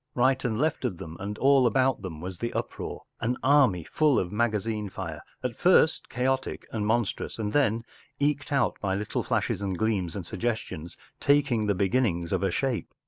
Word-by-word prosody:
Right 130 Hz, +1 st, +3 dB
and 115 Hz, -4 st, 0 dB
left 155 Hz, 0 st, 0 dB
of 110 Hz, -9 st, -1 dB
them 80 Hz, -3 st, -8 dB
and 100 Hz, +2 st, -4 dB
all 135 Hz, -2 st, +5 dB
about 130 Hz, +1 st, +2 dB
them 80 Hz, -5 st, -7 dB
was 90 Hz, 0 st, -6 dB
the 120 Hz, -, -3 dB
uproar, -, -, -4 dB, 0.2 s
an 120 Hz, +2 st, -1 dB
army 130 Hz, -, +4 dB
full 150 Hz, -, +2 dB
of 90 Hz, -1 st, 0 dB
magazine 105 Hz, -1 st, 0 dB
fire, 85 Hz, -5 st, -6 dB, 0.2 s
at -, -, -2 dB
first -, -, +4 dB
chaotic 130 Hz, +2 st, -1 dB
and 105 Hz, -2 st, -2 dB
monstrous 115 Hz, -1 st, -1 dB
and 105 Hz, -2 st, -2 dB
then, 115 Hz, -5 st, +2 dB, 0.3 s
eked 145 Hz, 0 st, 0 dB
out 135 Hz, -6 st, +1 dB
by 95 Hz, -2 st, 0 dB
little 105 Hz, +1 st, -2 dB
flashes -, -, -1 dB
and 95 Hz, -3 st, -2 dB
gleams 100 Hz, -6 st, 0 dB
and 95 Hz, -4 st, -5 dB
sugges¬ 115 Hz, +6 st, -1 dB
tions, 85 Hz, -4 st, -9 dB, 0.2 s
taking 140 Hz, -7 st, +3 dB
the 100 Hz, -, +2 dB
beginnings 95 Hz, -3 st, +1 dB
of 95 Hz, -, +1 dB
a 95 Hz, -, +2 dB
shape. 125 Hz, +6 st, -1 dB
110 Hz, 190 wpm, -27 LUFS, 95-130 Hz, 0.3 s, all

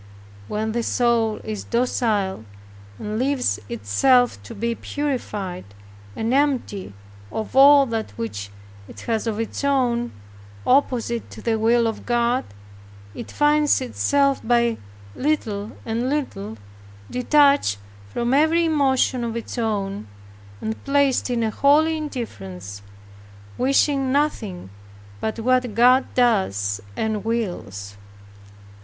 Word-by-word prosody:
When 215 Hz, -, -2 dB
the 235 Hz, +2 st, -1 dB
soul 230 Hz, -2 st, +1 dB
is 215 Hz, -1 st, -5 dB
docile, 220 Hz, -, 0 dB, 0.5 s
and 215 Hz, +1 st, -4 dB
leaves 255 Hz, -, 0 dB
itself 120 Hz, -, +2 dB
to 100 Hz, -, -10 dB
be 235 Hz, +3 st, -1 dB
purified, 220 Hz, -11 st, -4 dB, 0.5 s
and 225 Hz, +3 st, -1 dB
emptied 265 Hz, -, 0 dB, 0.4 s
of 220 Hz, -, -5 dB
all 280 Hz, +1 st, +8 dB
that 225 Hz, -3 st, -3 dB
which 100 Hz, -3 st, -5 dB, 0.4 s
it -, -, -11 dB
has 225 Hz, -1 st, -2 dB
of 220 Hz, -1 st, -2 dB
its 225 Hz, +4 st, -4 dB
own, 245 Hz, -4 st, +1 dB, 0.5 s
opposite 245 Hz, -3 st, +1 dB
to -, -, -10 dB
the 225 Hz, -1 st, 0 dB
will 230 Hz, +2 st, +3 dB
of 225 Hz, -1 st, -3 dB
God, 240 Hz, +1 st, +1 dB, 0.7 s
it -, -, -8 dB
finds 295 Hz, 0 st, +3 dB
itself 275 Hz, +2 st, +1 dB
by 235 Hz, 0 st, +2 dB, 0.4 s
little 225 Hz, -8 st, -1 dB
and 235 Hz, +3 st, -1 dB
little, 110 Hz, -, -3 dB, 0.5 s
detached 280 Hz, -, +3 dB, 0.3 s
from 235 Hz, -, -1 dB
every 320 Hz, +4 st, +4 dB
emotion 270 Hz, -5 st, +2 dB
of 230 Hz, -1 st, -3 dB
its 230 Hz, -, -6 dB
own, 200 Hz, -, -2 dB, 0.5 s
and 220 Hz, 0 st, -4 dB
placed 280 Hz, -2 st, +2 dB
in 240 Hz, -2 st, 0 dB
a 220 Hz, -, 0 dB
holy 305 Hz, +6 st, +3 dB
indifference, 100 Hz, -, -6 dB, 0.7 s
wishing 270 Hz, +1 st, +2 dB
nothing 220 Hz, -, -1 dB, 0.5 s
but 220 Hz, -, -3 dB
what 250 Hz, -1 st, +1 dB
God 250 Hz, +3 st, +4 dB
does 100 Hz, -, +1 dB, 0.2 s
and 220 Hz, -2 st, -1 dB
wills. 140 Hz, -, -4 dB
235 Hz, 115 wpm, -22 LUFS, 210-270 Hz, 0.7 s, all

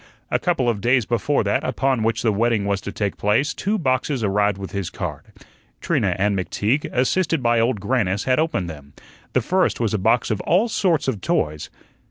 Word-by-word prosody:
A -, -, +2 dB
couple 170 Hz, -9 st, 0 dB
of 110 Hz, -4 st, 0 dB
days 120 Hz, +1 st, +2 dB
before 120 Hz, +6 st, 0 dB
that -, -, 0 dB
upon 135 Hz, -3 st, 0 dB
which 115 Hz, +1 st, 0 dB
the 115 Hz, -, +3 dB
wedding 110 Hz, -1 st, +1 dB
was 100 Hz, -1 st, -1 dB
to 100 Hz, -, -6 dB
take 100 Hz, -1 st, -3 dB
place, 115 Hz, +8 st, +1 dB
two 210 Hz, +3 st, -1 dB
boxes 130 Hz, -, 0 dB
arrived 100 Hz, 0 st, +1 dB
with 95 Hz, -1 st, -7 dB
his 100 Hz, -4 st, -3 dB
card. -, -, -6 dB, 0.5 s
Trina -, -, 0 dB
and 100 Hz, +1 st, +1 dB
McTeague, 105 Hz, +8 st, -1 dB
assisted 155 Hz, +3 st, +1 dB
by 120 Hz, -1 st, +3 dB
Old 115 Hz, -1 st, +1 dB
Grannis, 100 Hz, -2 st, 0 dB
had 130 Hz, +1 st, +2 dB
opened 155 Hz, -, 0 dB
them. 70 Hz, -3 st, -10 dB, 0.4 s
The 130 Hz, -, +3 dB
first 185 Hz, +10 st, +1 dB
was 115 Hz, -2 st, 0 dB
a 105 Hz, -, 0 dB
box 115 Hz, +5 st, +2 dB
of 110 Hz, -, -1 dB
all 195 Hz, +7 st, +2 dB
sorts 170 Hz, -9 st, +1 dB
of 110 Hz, -8 st, -2 dB
toys. 75 Hz, -3 st, -1 dB
115 Hz, 200 wpm, -22 LUFS, 100-135 Hz, 0.5 s, the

